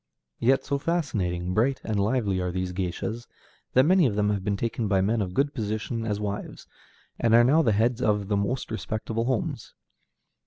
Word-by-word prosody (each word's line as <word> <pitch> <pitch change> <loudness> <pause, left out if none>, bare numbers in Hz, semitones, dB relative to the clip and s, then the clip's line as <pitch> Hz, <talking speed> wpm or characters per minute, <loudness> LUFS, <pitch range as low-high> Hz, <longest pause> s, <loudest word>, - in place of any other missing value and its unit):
Yet 130 +3 +2
so 140 0 -1
fascinating, 95 - -1
bright, 125 +7 +1
and 110 -2 -1
lively 100 -3 +1
are 90 - -1
these 90 0 -3
géishas 100 +6 -4 0.5
that 130 - +6
many 180 -2 +5
of 105 - -2
them 105 0 +2
have 100 -2 -2
been 100 0 -1
taken 115 0 -2
by 100 -2 +2
men 105 +4 +1
of 90 -2 -4
good 140 +1 +1
position 110 +1 -3
as 105 -1 -1
wives, 105 -1 -5 0.5
and 115 -1 +4
are 120 - +7
now 145 +7 +5
the 115 - +2
heads 115 +4 +1
of 105 -4 +1
the 105 - 0
most 115 +6 -2
respectable 110 +1 -3
homes. 130 -3 -2
110 Hz, 190 wpm, -26 LUFS, 100-125 Hz, 0.5 s, are